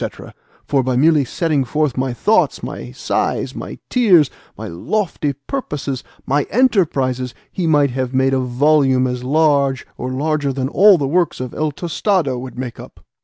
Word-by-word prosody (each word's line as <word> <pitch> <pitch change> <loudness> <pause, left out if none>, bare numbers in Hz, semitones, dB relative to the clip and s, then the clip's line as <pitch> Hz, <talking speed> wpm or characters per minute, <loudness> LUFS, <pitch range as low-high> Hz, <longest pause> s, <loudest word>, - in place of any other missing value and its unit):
for 140 -2 +2
by 130 0 -1
merely 150 +2 +4
setting 150 +1 0
forth 150 +1 -1
my 130 0 -1
thoughts, 210 - +1
my - - -6
sighs, - - -2
my - - -7
tears, 185 - +4 0.3
my - - -6
lofty 150 - -2
purposes, 145 - -4 0.2
my 145 +2 +2
enterprises, 135 - +1 0.2
he 180 -3 -2
might 145 -3 +3
have 130 0 -2
made 130 0 +2
a 135 - +2
volume 130 +1 +2
as 125 -1 -3
large, 140 -2 +2
or 130 - -3
larger 145 +2 -1
than 130 -1 -2
all 195 +4 +6
the 140 -3 -1
works 170 +2 +1
of 130 -1 -5
El 155 -1 -1
Tostado 165 - -1
would 130 0 -8
make 125 -2 -6
up. - - -13
140 Hz, 165 wpm, -18 LUFS, 130-160 Hz, 0.3 s, all